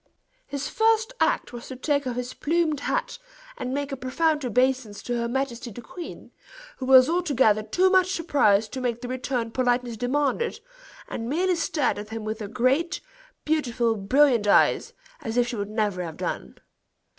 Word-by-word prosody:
His 280 Hz, 0 st, -4 dB
first 450 Hz, +1 st, +2 dB
act -, -, +1 dB
was 240 Hz, 0 st, -8 dB
to 260 Hz, -, -7 dB
take 285 Hz, +1 st, 0 dB
off 245 Hz, -, -2 dB
his 250 Hz, 0 st, -4 dB
plumed 320 Hz, -2 st, 0 dB
hat, 480 Hz, -, -2 dB, 0.4 s
and 255 Hz, -, -4 dB
make 285 Hz, +1 st, -2 dB
a -, -, -2 dB
profound 295 Hz, +4 st, 0 dB
obeisance 250 Hz, -3 st, 0 dB
to 245 Hz, -, -2 dB
her 235 Hz, -, -1 dB
majesty 250 Hz, -1 st, -3 dB
the 235 Hz, +2 st, -10 dB
queen, 350 Hz, +6 st, -9 dB, 0.5 s
who 260 Hz, -, -5 dB
was 260 Hz, -1 st, +8 dB
altogether 280 Hz, -11 st, +2 dB
too 360 Hz, -, +2 dB
much 370 Hz, -1 st, +4 dB
surprised 275 Hz, -, +2 dB
to 260 Hz, -, -4 dB
make 240 Hz, -2 st, -2 dB
the 250 Hz, -, -5 dB
return 250 Hz, -2 st, -2 dB
politeness 245 Hz, -1 st, 0 dB
demanded, 285 Hz, -, 0 dB, 0.5 s
and 230 Hz, 0 st, -5 dB
merely 360 Hz, +6 st, +1 dB
stared 310 Hz, -, 0 dB
at 210 Hz, 0 st, -8 dB
him 225 Hz, 0 st, -5 dB
with 215 Hz, +1 st, -3 dB
her 210 Hz, -, -5 dB
great, 255 Hz, -, +1 dB, 0.5 s
beautiful, 240 Hz, -7 st, +1 dB
brilliant 235 Hz, +2 st, +3 dB
eyes, -, -, +3 dB, 0.3 s
as 225 Hz, +1 st, -4 dB
if 245 Hz, 0 st, +3 dB
she 240 Hz, -, -3 dB
would 205 Hz, -1 st, -3 dB
never 210 Hz, -4 st, -1 dB
have 165 Hz, -3 st, -6 dB
done. 65 Hz, -, -4 dB
255 Hz, 175 wpm, -25 LUFS, 230-295 Hz, 0.5 s, was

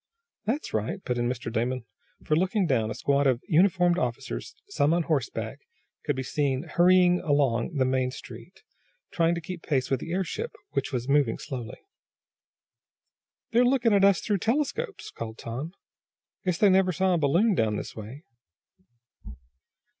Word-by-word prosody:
"That's 260 Hz, +9 st, -2 dB
right," 110 Hz, +1 st, -2 dB
put 125 Hz, -1 st, -2 dB
in 120 Hz, 0 st, 0 dB
Mr. 125 Hz, -2 st, -4 dB
Damon, 120 Hz, +1 st, -1 dB, 0.4 s
for, 155 Hz, -, +1 dB
looking 190 Hz, +4 st, +1 dB
down, 120 Hz, -8 st, +1 dB
a -, -, -4 dB
squad 140 Hz, 0 st, +2 dB
of 125 Hz, -3 st, +2 dB
uniformed 175 Hz, +1 st, +3 dB
officers, 130 Hz, -, -4 dB
some 165 Hz, -, +2 dB
on 175 Hz, -, +1 dB
horseback, 145 Hz, -8 st, -2 dB, 0.5 s
could 145 Hz, -, 0 dB
be 130 Hz, -, -3 dB
seen 135 Hz, 0 st, -1 dB
hurrying 180 Hz, +1 st, +4 dB
along 145 Hz, -3 st, +1 dB
the 130 Hz, -2 st, +2 dB
main 130 Hz, 0 st, +1 dB
street, -, -, -11 dB, 0.5 s
trying 170 Hz, 0 st, +2 dB
to 170 Hz, -, -4 dB
keep 175 Hz, +1 st, -7 dB
pace 135 Hz, -5 st, -1 dB
with 135 Hz, -, +2 dB
the 165 Hz, -, -7 dB
airship, 185 Hz, -2 st, -3 dB, 0.2 s
which 140 Hz, -1 st, -2 dB
was 125 Hz, -2 st, -3 dB
moving 140 Hz, -5 st, +2 dB
slowly. 125 Hz, -4 st, -6 dB, 1.7 s
"They're 240 Hz, +1 st, +4 dB
looking 245 Hz, -3 st, +3 dB
at 200 Hz, -1 st, +4 dB
us 200 Hz, -2 st, +5 dB
through 205 Hz, -3 st, 0 dB
telescopes," 300 Hz, -, -2 dB
called 115 Hz, -1 st, -7 dB
Tom. 130 Hz, +8 st, -5 dB, 0.7 s
"Guess 180 Hz, -2 st, +1 dB
they 205 Hz, -1 st, +5 dB
never 185 Hz, 0 st, +4 dB
saw 185 Hz, +2 st, +1 dB
a 175 Hz, -, +2 dB
balloon 170 Hz, +10 st, +3 dB
down 110 Hz, -, +1 dB
this -, -, -6 dB
way." 115 Hz, +8 st, -9 dB
150 Hz, 160 wpm, -27 LUFS, 130-185 Hz, 1.7 s, us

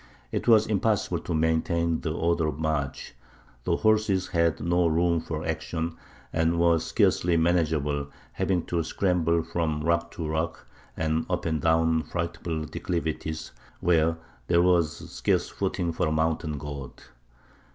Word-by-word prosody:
It -, -, -3 dB
was 110 Hz, -2 st, +6 dB
impossible 105 Hz, -4 st, 0 dB
to 85 Hz, -, -3 dB
maintain 80 Hz, +1 st, +1 dB
the 80 Hz, -, -2 dB
order 85 Hz, 0 st, +1 dB
of 75 Hz, -2 st, -3 dB
march; 75 Hz, -3 st, -2 dB, 0.5 s
the -, -, +2 dB
horses 105 Hz, -4 st, +2 dB
had 85 Hz, -2 st, +1 dB
no 85 Hz, +1 st, +2 dB
room 85 Hz, +1 st, +2 dB
for 80 Hz, -1 st, -5 dB
action, 80 Hz, +1 st, -3 dB, 0.4 s
and 85 Hz, +1 st, +1 dB
were 85 Hz, -1 st, +4 dB
scarcely 85 Hz, +2 st, +2 dB
manageable, 80 Hz, -4 st, +1 dB, 0.2 s
having 90 Hz, -3 st, 0 dB
to 85 Hz, -1 st, 0 dB
scramble 85 Hz, -1 st, +1 dB
from 80 Hz, -2 st, -2 dB
rock 85 Hz, +1 st, +1 dB
to 80 Hz, -, -4 dB
rock, 80 Hz, +2 st, -2 dB, 0.3 s
and 80 Hz, 0 st, 0 dB
up -, -, -1 dB
and 80 Hz, -3 st, 0 dB
down 80 Hz, 0 st, +3 dB
frightful 85 Hz, -1 st, -3 dB
declivities, 80 Hz, -1 st, -3 dB, 0.3 s
where 80 Hz, -1 st, +2 dB, 0.3 s
there 85 Hz, 0 st, +4 dB
was 85 Hz, -4 st, +2 dB
scarce -, -, 0 dB
footing 85 Hz, -1 st, -2 dB
for 85 Hz, 0 st, 0 dB
a -, -, 0 dB
mountain 80 Hz, -1 st, 0 dB
goat. 70 Hz, -2 st, -8 dB
80 Hz, 140 wpm, -27 LUFS, 80-85 Hz, 0.5 s, was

